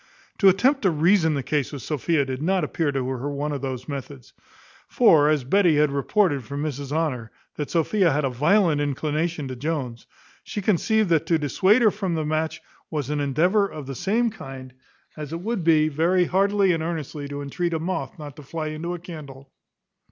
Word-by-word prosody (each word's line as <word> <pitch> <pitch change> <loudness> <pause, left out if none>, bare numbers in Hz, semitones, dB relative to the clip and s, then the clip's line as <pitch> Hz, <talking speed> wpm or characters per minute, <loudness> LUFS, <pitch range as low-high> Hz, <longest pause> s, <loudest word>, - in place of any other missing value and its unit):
To 195 - +7
attempt 255 +9 +2
to 195 - +3
reason 160 0 +3
the 140 - -2
case 145 -2 -1
with 140 -4 -7
Sophia 150 0 0
did 130 0 -5
not 185 +2 +1
appear 150 0 -1
to 135 -2 -2
her 130 +2 -3
one 145 +1 -3
of 140 -2 -4
those 130 -2 -5
methods: 140 -2 -8 0.5
for 150 -2 +5
as 150 -3 +1
Betty 175 +4 +3
had 150 -1 +3
reported 140 - +1
from 140 +6 -5
Mrs 140 -2 -4
Honour, 145 -8 -1 0.3
that 150 - -4
Sophia 175 +2 +2
had 145 +1 0
a - - +1
violent 155 - +2
inclination 150 +2 -2
to 130 - -5
Jones, 130 -4 -4 0.4
she - - -5
conceived 210 +1 +1
that 165 -3 +2
to 165 - +3
dissuade 190 - +3
her 215 - +5
from 190 -4 -3
the 155 -1 -2
match 155 +1 -2 0.3
was 150 -3 -3
an 150 - -1
endeavour 175 +9 +2
of 150 -6 -8
the 135 - -6
same 220 - 0
kind, 135 -10 -10 0.4
as 150 -1 -7
it 165 - -4
would 220 -2 -2
be 155 -2 +4
very 170 +4 +2
heartily 195 +1 +2
and 165 -2 0
earnestly 155 -3 -4
to 145 0 -6
entreat 170 +5 -2
a - - -1
moth 185 +3 -4
not 150 -3 -9
to - - -9
fly 155 +2 -5
into 165 +3 -4
a - - -8
candle. 145 -6 -10
155 Hz, 200 wpm, -24 LUFS, 140-180 Hz, 0.5 s, To